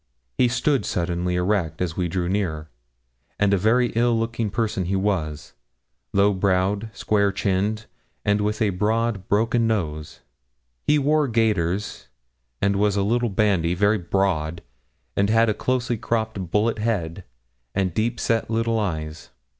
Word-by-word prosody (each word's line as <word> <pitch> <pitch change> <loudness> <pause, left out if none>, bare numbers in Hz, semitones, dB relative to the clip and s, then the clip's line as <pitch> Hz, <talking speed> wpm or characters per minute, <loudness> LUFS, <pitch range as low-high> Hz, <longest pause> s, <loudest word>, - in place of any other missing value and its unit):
He 125 - +3
stood 135 +3 +1
suddenly 90 +1 -1
erect 90 -3 0
as 85 -3 -2
we 90 -2 0
drew 85 0 -2
near, 85 -6 -2 0.7
and 100 -1 +3
a - - +6
very 120 +5 +3
ill 120 +1 +2
looking 115 -1 -1
person 105 -3 -1
he 95 +3 -1
was, 85 -7 -2 0.6
low 100 +1 +3
browed, 100 +3 0
square 100 -2 +1
chinned, 100 +3 -1 0.4
and 105 0 +2
with 105 +2 0
a 105 - +2
broad, 105 +1 0
broken 115 +2 +2
nose. 80 -9 -3 0.7
He 150 - +5
wore 150 +1 +2
gaiters, 105 -5 0 0.6
and 100 0 +2
was 105 0 +2
a 100 - +1
little 120 +3 +1
bandy, 95 -4 +1
very 105 +3 +2
broad, 85 -3 -1 0.5
and 100 +1 +2
had 115 +1 +4
a - - +2
closely 125 +1 -1
cropped 110 -5 -2
bullet 110 +4 +1
head, 100 -6 -2 0.5
and 95 -3 0
deep 115 +4 -1
set 115 -1 0
little 115 0 0
eyes. 80 -6 -4
100 Hz, 145 wpm, -23 LUFS, 90-115 Hz, 0.7 s, a